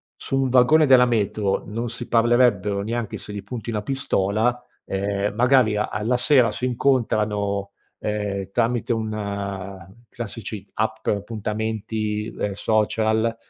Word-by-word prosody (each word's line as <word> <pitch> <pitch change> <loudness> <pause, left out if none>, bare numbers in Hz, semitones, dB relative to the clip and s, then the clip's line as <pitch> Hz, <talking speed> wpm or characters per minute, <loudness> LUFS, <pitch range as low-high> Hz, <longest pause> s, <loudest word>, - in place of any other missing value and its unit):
su 135 0 -1
un 130 - 0
vagone 130 +5 +5
della 130 -3 +7
metro, 105 -3 0
non 115 +4 -4
si 120 +1 -6
parlerebbero 115 -4 +3
neanche 115 0 -3
se 105 - -9
gli 100 - -5
punti 115 +3 -6
una 105 -2 -2
pistola, 120 -1 0 0.2
ehm, 100 +1 -1
magari 125 -3 +4
a 105 - 0
alla 110 +6 0
sera 125 -2 +4
si 125 - -3
incontrano, 105 -6 0 0.3
ehm, 100 -2 -3
tramite 120 +1 +1
un 100 -4 -4 0.2
classici 110 -2 -6
app 110 0 0
per 105 - +1
appuntamenti, 110 0 -3
ehm, 105 - -1
social 110 +2 +1
110 Hz, 135 wpm, -23 LUFS, 100-120 Hz, 0.3 s, della